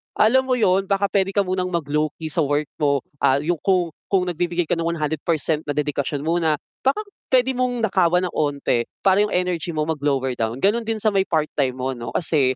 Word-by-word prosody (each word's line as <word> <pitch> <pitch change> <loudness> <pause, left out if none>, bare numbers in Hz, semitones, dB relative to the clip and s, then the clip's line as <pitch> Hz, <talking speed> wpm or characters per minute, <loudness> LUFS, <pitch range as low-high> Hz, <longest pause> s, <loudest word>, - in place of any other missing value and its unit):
alam 260 +5 +4
mo 255 - +2
'yun, 195 -4 +2
baka 200 -1 +1
puwede 195 0 +1
ka 200 - +4
munang 185 0 -1
mag 170 -3 -1
lowkey 155 +1 -1
sa 170 - 0
work 145 +1 0
mo. 140 -3 +1 0.2
Ah, 140 0 +3
'yung 165 0 -1
kung 180 -4 +1 0.2
kung 190 -2 +2
nagbibigay 175 0 -1
ka 165 +1 -1
ng 165 0 -1
100% 160 -1 -1
na 145 - -2
dedikasyon 145 -1 -2
mo 170 +2 +1
na 160 -2 +2 0.3
baka 280 +11 +2 0.2
puwede 260 0 +3
mong 250 -2 -1
nakawan 180 -3 +2
ng 180 - -2
'onti 140 -5 0 0.2
para 195 +1 +4
'yung 210 0 +1
energy 175 -2 -1
mo 155 - +1
mag-lower 145 -4 0
down, 115 +3 -2
gano'n 225 +3 +2
din 220 -2 -2
sa 215 - +3
may 195 -1 +1
part-time 150 -5 0
mo 130 +1 -2
'no 120 -2 -6
kasi 140 -6 +2
170 Hz, 210 wpm, -22 LUFS, 145-195 Hz, 0.3 s, alam